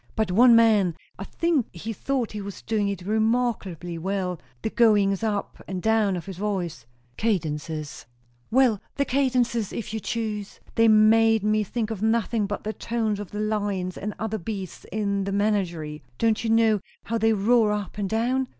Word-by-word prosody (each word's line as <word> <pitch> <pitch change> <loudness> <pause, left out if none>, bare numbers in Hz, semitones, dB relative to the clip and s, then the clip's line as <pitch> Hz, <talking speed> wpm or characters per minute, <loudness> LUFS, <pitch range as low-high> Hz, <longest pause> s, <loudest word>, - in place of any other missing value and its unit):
But 215 -4 0
one 235 +5 +7
man 210 -7 +4 0.2
I - - -4
think 330 -4 0
he 220 +7 -5
thought 255 +2 -2
he 210 - -5
was 200 -1 -8
doing 215 -2 0
it 195 -3 -3
remarkably 215 -6 -1
well 185 -1 -2 0.2
the 220 - -1
goings 205 -4 +3
up 210 -3 -2
and 190 -1 -3
down 220 -1 +2
of 175 - -5
his 190 -3 -7
voice 185 - -3
" 120 0 -37
"Cadences 155 - -2 0.2
" 120 0 -38
"Well, 245 -4 +3
the 280 - +1
cadences 250 -5 +1
if 220 -1 -5
you 220 - -2
choose; 210 -2 -4
they 225 0 +4
made 220 0 +5
me 215 0 +2
think 225 +2 -3
of 210 -3 -5
nothing 220 -1 +1
but 205 0 -4
the 215 - -3
tones 220 -3 -2
of 205 - -6
the 210 - -6
lions 205 -4 -1
and 210 +1 -5
other 220 0 -3
beasts 195 -1 -6
in 200 -2 -1
the 200 - -2
menagerie. 180 -7 -1 0.2
Don't 225 -1 +1
you 225 - -1
know 225 -2 +4 0.2
how 230 +1 -2
they 225 +1 +3
roar 220 +1 +3
up 210 0 -4
and 200 -2 -1
down? 250 +5 0
210 Hz, 185 wpm, -25 LUFS, 195-225 Hz, 0.2 s, one